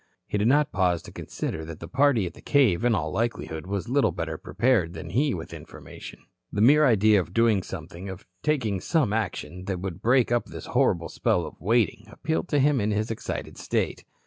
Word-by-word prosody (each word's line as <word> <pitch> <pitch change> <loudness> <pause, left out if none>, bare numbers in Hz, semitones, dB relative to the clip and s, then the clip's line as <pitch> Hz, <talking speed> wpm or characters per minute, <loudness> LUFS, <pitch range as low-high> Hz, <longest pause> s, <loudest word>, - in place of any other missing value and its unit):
He 105 - -2
did 105 - +2
not 145 +3 +3
pause 90 -4 +1
to - - -11
consider 80 - -5
that 80 0 -8
the - - -8
party 135 -5 +3
at 85 - -5
the - - -15
cave 120 - +3
in 120 -2 +3
all 80 -5 -2
likelihood 95 -7 -3
was 100 +2 -3
little 135 +3 +2
better - - -4
prepared 110 -10 +1
than 80 0 -7
he 135 +6 +1
with 80 -1 -7
information. - - -11 0.3
The - - -3
mere 145 +7 +6
idea 110 -3 +5
of 90 0 -5
doing 115 -4 +4
something, 90 +1 -8
of 95 -1 -8 0.2
taking 115 -11 0
some 145 - +1
action 95 -4 -3
that 95 -2 -3
would 90 -2 -5
break 125 0 +3
up 120 -1 +1
this - - -8
horrible - - +1
spell - - 0
of - - -11
waiting, 110 +2 +1
appealed 160 +3 -2
to 145 - +2
him 140 -2 +3
in 105 - 0
his 105 +2 -1
excited 115 - -5
state. - - -2
105 Hz, 205 wpm, -26 LUFS, 90-125 Hz, 0.3 s, mere